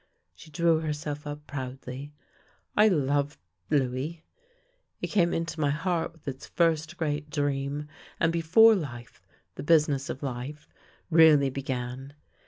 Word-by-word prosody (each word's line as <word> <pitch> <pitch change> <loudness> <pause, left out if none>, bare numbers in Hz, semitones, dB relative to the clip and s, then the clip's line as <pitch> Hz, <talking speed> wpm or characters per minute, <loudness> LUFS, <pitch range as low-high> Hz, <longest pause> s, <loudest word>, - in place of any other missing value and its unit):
She - - -15
drew 165 0 +2
herself 150 -1 -4
up 145 0 -7
proudly. 130 0 -6 0.3
" - - -36 0.3
I 210 +1 +6
loved 145 -5 +1 0.2
— 90 0 -45
Louis. 140 +4 -1 0.7
He - - -4
came 175 -5 +2
into 165 -1 -3
my 145 -2 +2
heart 165 +3 -1
with 165 -3 -24
its 135 -1 -6
first 165 0 +1
great 150 -2 -2
dream, 145 0 -2 0.3
and 165 0 +2
before 185 +8 +6
life 120 - -5 0.2
— - - -44
the - - -4
business 150 -3 +3
of 135 - -5
life 135 +3 -5 0.2
— - - -32
really 155 -4 +6
be 140 - -4
gan. 130 +1 -5
150 Hz, 155 wpm, -28 LUFS, 135-165 Hz, 0.7 s, I